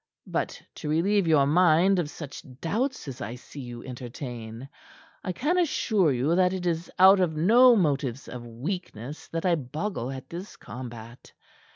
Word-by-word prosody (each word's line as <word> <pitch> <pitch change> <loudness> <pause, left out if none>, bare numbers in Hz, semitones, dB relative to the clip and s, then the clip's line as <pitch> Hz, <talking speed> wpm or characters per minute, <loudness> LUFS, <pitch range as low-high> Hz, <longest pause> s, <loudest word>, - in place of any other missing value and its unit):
"But - - -2 0.2
to 150 - -5
relieve 185 +4 +2
your 150 -4 +5
mind 175 +4 +4
of 160 -4 -1
such 145 -3 -8 0.2
doubts 240 - -2
as 130 -2 -7
I 115 - -4
see 135 +3 -12
you 120 -2 -7
entertain, 120 -1 -7 0.6
I 185 - -2
can 300 - +1
assure 215 - +2
you 135 +5 +1
that 180 0 +3
it 185 -1 -4
is 170 0 -1
out 190 +1 +8
of 175 -4 +1
no 235 +9 +7
motives 140 - 0
of 125 -1 -7
weakness 130 - -6
that 165 +1 -4
I 180 - +4
boggle 150 - -3
at 130 -1 -7
this 175 +6 -8
combat. 120 -1 -9
155 Hz, 165 wpm, -27 LUFS, 125-185 Hz, 0.6 s, out